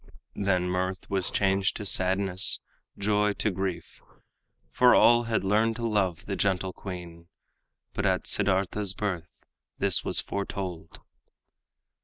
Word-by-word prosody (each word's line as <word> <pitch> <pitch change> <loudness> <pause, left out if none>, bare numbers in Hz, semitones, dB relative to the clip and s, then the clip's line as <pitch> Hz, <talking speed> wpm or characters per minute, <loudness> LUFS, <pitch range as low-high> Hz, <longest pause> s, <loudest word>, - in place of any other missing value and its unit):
Then 95 -3 0
mirth 95 +1 -2
was 95 -3 +1
changed 95 0 +1
to 105 - -6
sadness, 95 0 +2 0.4
joy 105 0 +1
to 105 - -1
grief, 95 -3 -5 0.7
For 125 -1 +5
all 120 0 +5
had 115 -3 -1
learned 110 +3 +2
to 115 0 -2
love 95 -6 -1
the 100 - -3
gentle 95 -1 0
queen 85 -3 -9 0.7
But - - 0
at - - 0
Siddartha's 95 0 0
birth 90 -5 -5 0.3
this - - +2
was - - -1
foretold. 95 -4 -5
95 Hz, 125 wpm, -27 LUFS, 90-105 Hz, 0.7 s, For